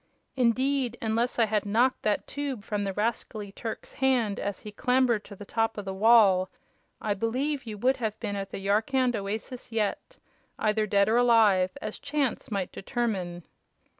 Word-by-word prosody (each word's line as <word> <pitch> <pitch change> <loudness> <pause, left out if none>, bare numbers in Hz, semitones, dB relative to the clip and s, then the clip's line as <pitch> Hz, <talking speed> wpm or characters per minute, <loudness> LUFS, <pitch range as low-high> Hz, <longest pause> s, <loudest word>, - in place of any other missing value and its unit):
Indeed, 255 0 +1
unless 230 +2 0
I 230 - +5
had 215 -1 0
knocked 235 +5 +2
that 210 -1 0
tube 280 -7 -4
from 210 -2 -2
the 195 - -2
rascally 210 -1 -2
Turk's 225 +2 -7
hand 250 -6 +1
as 200 -1 -4
he 210 - -8
clambered 250 0 +2
to 200 - -10
the 205 - -10
top 225 +1 -1
of 205 - -5
the 190 - -3
wall, 195 -3 +5 0.5
I 210 - 0
believe 255 +7 -1
you 215 -1 -5
would 255 +5 +2
have 220 -3 -3
been 210 -3 -3
at 195 -1 -4
the - - -6
Yarkand 225 +6 +1
oasis 215 +5 -5
yet 225 - -2 0.4
either 215 0 +1
dead 200 0 +3
or 225 +2 +3
alive, 225 -4 +4
as - - -5
chance 280 -4 -2
might 200 -4 -2
determine." 190 -7 -3
220 Hz, 170 wpm, -28 LUFS, 205-245 Hz, 0.5 s, I